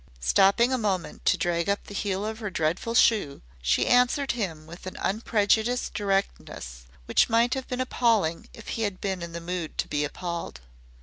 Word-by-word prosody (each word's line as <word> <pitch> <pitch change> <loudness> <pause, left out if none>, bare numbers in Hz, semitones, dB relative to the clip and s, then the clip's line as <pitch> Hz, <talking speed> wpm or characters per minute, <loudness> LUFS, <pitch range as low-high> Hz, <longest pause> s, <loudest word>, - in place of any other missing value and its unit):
Stopping 195 - +4
a 255 - +1
moment 195 -5 -2
to - - +4
drag 170 +1 0
up 200 - 0
the - - -11
heel 200 0 -2
of 220 +1 -4
her 210 -3 -3
dreadful 175 +7 -1
shoe, 210 - +3 0.2
she 60 0 +2
answered 250 +3 +3
him 175 -10 -4
with 170 +3 -10
an 185 - -7
unprejudiced 220 +3 +1
directness 195 - -3 0.2
which - - +3
might 230 +2 +3
have 265 -1 -4
been 250 - -4
appalling 225 -10 +1
if - - -11
he 225 - -3
had 205 -4 -2
been 190 -3 -2
in 170 -1 -6
the 170 - -4
mood 170 -1 -5
to - - 0
be 145 0 -1
appalled. 170 - -5
195 Hz, 185 wpm, -26 LUFS, 170-230 Hz, 0.2 s, Stopping